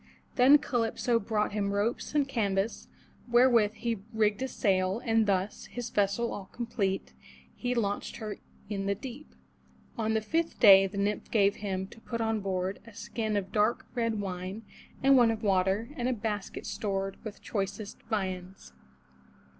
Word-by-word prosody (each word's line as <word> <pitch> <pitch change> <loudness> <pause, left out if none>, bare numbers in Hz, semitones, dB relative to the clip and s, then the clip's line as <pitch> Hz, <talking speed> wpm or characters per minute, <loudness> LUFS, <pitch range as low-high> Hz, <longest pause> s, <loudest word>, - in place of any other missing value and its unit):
Then 270 +4 +8
Calypso 235 -3 0
brought 210 0 0
him 200 -1 -1
ropes 220 +8 -1
and 285 -2 +3
canvas 205 -4 -1 0.4
wherewith 240 -3 +5
he 230 -3 -2
rigged 215 -1 +1
a 265 - 0
sail, 190 -5 +1
and 225 -2 +3
thus, 195 0 -1
his 240 -1 -6
vessel 205 +4 +1
all 195 -2 -7
complete, 210 -5 -2 0.4
he 250 0 -2
launched 205 -3 -1
her 215 -2 -5 0.3
in 195 -1 -3
the 200 - +1
deep. 265 +7 -9 0.6
On 220 0 +1
the 220 - +2
fifth 325 +9 -1
day 195 -4 +8
the 195 +1 -8
nymph 205 +1 -1
gave 200 -2 +3
him, 190 -2 -3
to 225 - -15
put 230 0 -4
on 225 -1 0
board, 190 -1 -2
a 230 - -13
skin 220 -1 -2
of 190 -1 -3
dark 215 +2 +1
red 230 -3 0
wine, 190 +2 -5 0.4
and 270 0 +7
one 240 -2 +6
of 225 0 -2
water, 195 +4 +1
and 245 -1 -1
a - - +1
basket 210 -3 -4
stored 195 -2 -3
with 215 -2 -7
choicest 200 0 -4
viands. 185 - -4
210 Hz, 160 wpm, -29 LUFS, 195-230 Hz, 0.6 s, Then